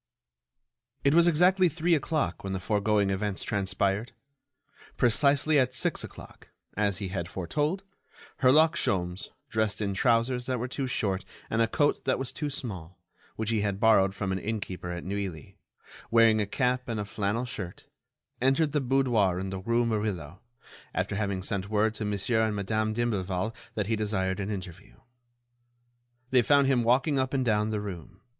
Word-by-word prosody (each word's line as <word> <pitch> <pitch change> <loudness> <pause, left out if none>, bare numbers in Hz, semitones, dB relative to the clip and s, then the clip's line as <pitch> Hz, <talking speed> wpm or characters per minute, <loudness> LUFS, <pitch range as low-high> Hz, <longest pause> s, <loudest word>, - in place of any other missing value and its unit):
It 140 - +4
was 170 +1 +6
exactly 180 +3 +4
three 170 +2 +1
o'clock 150 - 0
when 95 0 -3
the 95 - -2
foregoing 105 0 +1
events 100 0 -2
transpired. 100 +2 -1 0.8
Precisely 140 +5 +3
at 130 -1 +1
six - - +1
o'clock, - - -12 0.3
as 100 -1 0
he 100 -3 -4
had 85 -3 -3
foretold, 150 - -2 0.5
Herlock 155 +5 +5
Sholmes, 90 - -1 0.2
dressed 110 -2 -1
in 100 -2 -1
trousers 120 +3 +1
that 130 -1 0
were 125 +2 -3
too 135 +1 -3
short 100 -6 -1 0.3
and 110 - +2
a 115 - +3
coat 145 +6 +1
that 130 - +2
was 135 -1 -3
too 150 -2 -3
small, 95 - -6 0.4
which 110 0 -2
he 110 -2 +1
had 100 -1 -1
borrowed 100 -3 +4
from 100 -2 -2
an 95 - -1
innkeeper 100 -4 -4
at 85 0 -5
Neuilly, 95 -6 -5 0.5
wearing 115 -2 +5
a 105 - -1
cap 125 +2 0
and 115 -2 -2
a 105 - -2
flannel 105 +4 -2
shirt, 95 -7 -7 0.6
entered 135 +4 +3
the 145 0 +1
boudoir 120 -8 +2
in 95 0 -4
the 95 - -4
Rue 115 +5 +1
Murillo, 100 -7 -3 0.5
after - - -1
having 100 -2 -2
sent 100 -1 -3
word 110 +1 +2
to 110 - -4
Monsieur 105 +3 0
and 110 -1 +1
Madame 110 +2 -1
d'Imblevalle 110 -3 -1 0.2
that 105 - -1
he 110 +3 0
desired 100 -3 -1
an 100 0 -3
interview. 90 - -7 1.4
They 130 -1 +5
found 140 +3 +4
him 135 -2 +3
walking 130 +4 +2
up 130 +1 -1
and 130 -1 +1
down 105 -2 +2
the 110 -1 -1
room. 95 -1 -8
110 Hz, 170 wpm, -28 LUFS, 95-125 Hz, 1.4 s, was